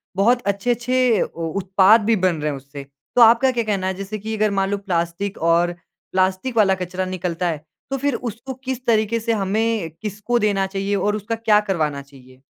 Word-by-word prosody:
बहुत 235 +6 +3
अच्छे-अच्छे 240 +2 +1
ओ 165 -1 -3
उत्पाद 195 +4 +5
भी 230 +1 +3
बन 185 -4 +1
रहे 150 - 0
हैं 140 - -5
उससे। 140 +1 -10 0.3
तो 245 - +5
आपका 235 +3 +6
क्या 240 -2 -1
कहना 200 -4 -1
है 190 - 0
जैसे 195 +3 -6
कि 220 +2 -4
अगर 215 0 +2
मान 195 -1 0
लो 205 - 0
प्लास्टिक 185 0 -2
और 175 +1 +2 0.4
प्लास्टिक 190 +6 0
वाला 195 -3 +5
कचरा 185 0 -4
निकलता 180 -1 -3
है 155 -1 -5 0.3
तो 270 - 0
फ़िर 285 -1 0
उसको 240 +3 -6
किस 260 -1 -4
तरीक़े 225 0 +2
से 230 +1 -1
हमें 215 -1 0
किसको 215 +3 -1
देना 200 -3 +1
चाहिए 195 +1 -2
और 205 +1 0
उसका 215 +2 -3
क्या 220 -2 +3
करवाना 155 -7 -1
चाहिए? 130 -2 -18
200 Hz, 195 wpm, -21 LUFS, 185-230 Hz, 0.4 s, आपका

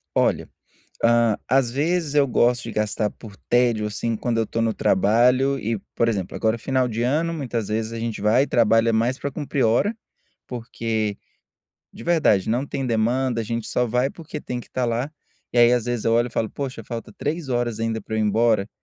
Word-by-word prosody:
Olha, - - +2 0.4
hum 115 -2 +2
às 130 -2 +2
vezes 155 +2 0
eu 145 -1 +4
gosto 120 0 +2
de 115 - -6
gastar 105 0 -1
por 105 -4 -13
tédio, 120 -3 +1
assim, 110 +2 -2
quando 115 0 -1
eu 115 - +2
estou 115 +2 -2
no 115 - +1
trabalho 125 +9 +3
e, 115 -1 -2 0.3
exemplo 95 -5 -2
agora 110 0 +1
final 130 +1 0
de 115 +1 -2
ano 160 +6 +1
muitas 120 -8 -3
vezes 110 +1 -2
a 115 - -4
gente 115 -3 -4
vai 115 +6 +4
e - - -8
trabalha 115 0 +3
mais 120 +4 +1
para 140 - -3
cumprir 140 -1 -1
hora, 120 - +2 0.5
porque, 115 -3 -3 0.8
de - - -10
verdade 155 - +3
não 125 +4 +1
tem 135 -1 -3
demanda, 120 +1 +1
a - - -4
gente 115 0 -3
só 125 -1 0
vai 125 +4 +1
porque 160 -2 -8
tem 125 -1 -4
que - - -12
estar 125 -1 -2
lá, 120 +5 -1 0.4
e 120 - 0
aí 120 +1 +7
às 120 -1 0
vezes 120 -2 -2
eu 115 - +3
olho 120 +1 +3
e - - -13
falo: 110 - -1
"Poxa 130 -5 -5
falta 115 +1 -7
3 150 -1 -3
horas 120 -2 -1
ainda 115 0 -1
para 110 - -8
eu - - 0
ir - - +2
embora", 110 -1 +2
120 Hz, 205 wpm, -23 LUFS, 110-130 Hz, 0.8 s, aí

